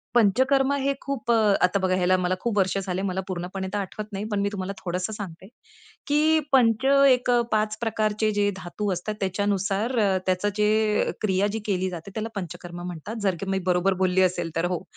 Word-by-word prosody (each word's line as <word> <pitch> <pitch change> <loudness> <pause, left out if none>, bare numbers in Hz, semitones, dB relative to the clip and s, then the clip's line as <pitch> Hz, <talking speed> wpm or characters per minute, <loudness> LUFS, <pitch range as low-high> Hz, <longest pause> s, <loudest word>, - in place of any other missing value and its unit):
पंचकर्म 260 +5 +3
हे 280 0 0
खूप 240 -4 -2
अ, 215 -3 +4
आता 180 +2 +3
बघा, 185 -1 +1
ह्याला 185 0 +3
मला 180 0 0
खूप 230 -3 -2
वर्षे 195 0 +1
झाली. 185 -1 -3
मला 190 -1 -2
पूर्णपणे 185 +1 -4
तर 205 - 0
आठवत 200 +2 -5
नाही, 195 +2 -3
पण 205 - 0
मी 200 - +1
तुम्हाला 195 -1 -4
थोडंसं 185 +4 -3
सांगते, 190 -3 -8 0.6
की 305 +2 +3
पंच 240 -2 +4 0.2
एक 250 -1 +2
अ, 240 - +4
5 215 0 +1
प्रकारचे 215 -1 0
जे 205 0 +3
धातू 190 +3 -3
असतात, 185 +4 -4
त्याच्यानुसार 200 +4 0 0.3
त्याची 185 +2 +1
जे 210 0 +2
क्रिया 195 -1 +2 0.2
केली 190 -2 0
जाते, 175 +2 -8
त्याला 220 +1 -3
पंचकर्म 175 -1 -6
म्हणतात. 180 +5 -6
जर 195 -3 +1
मी 195 0 0
बरोबर 180 +1 +2
बोलली 185 0 +3
असेल 175 -2 +1
तर 165 +1 +1
हो. 175 -1 -2
200 Hz, 185 wpm, -25 LUFS, 185-215 Hz, 0.6 s, अ